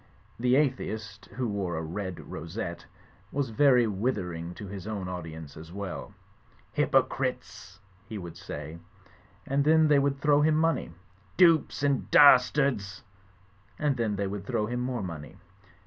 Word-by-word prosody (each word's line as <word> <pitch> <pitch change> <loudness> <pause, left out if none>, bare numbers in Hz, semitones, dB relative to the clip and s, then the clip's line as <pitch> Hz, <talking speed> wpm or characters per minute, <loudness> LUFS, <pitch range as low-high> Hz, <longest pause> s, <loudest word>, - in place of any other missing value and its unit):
The 125 +1 +3
atheist 110 -8 -1
(who 125 -1 -3
wore 95 -5 -2
a - - -2
red 95 +2 -5
rosette) 85 +2 -6 0.4
was 140 -4 -2
very 125 0 +5
withering 95 -6 -3
to 105 - -8
his 100 0 -8
own 100 -4 -4
audience 80 -4 -7
as 80 +2 -11
well. 100 -1 -6 0.6
"H)rpocritesl" - - 0 0.3
he 110 - -5
would 85 -4 -8
say; 80 -2 -7 0.7
and 140 +1 +1
then 160 +1 +4
they 145 -1 +5
would 140 0 0
throw 145 0 +4
him 155 +1 +3
money. 165 - +1 0.5
"Dupes 165 -5 +4
and 140 -2 +1
das 130 -4 +8
tards 125 -9 -1 0.8
I" 155 - -3
and 140 -3 +2
then 110 -3 0
they 100 0 -1
would 100 0 -5
throw 105 - 0
him 120 +3 -3
more 125 -3 -2
money. 80 -5 -7
105 Hz, 150 wpm, -28 LUFS, 90-135 Hz, 0.8 s, das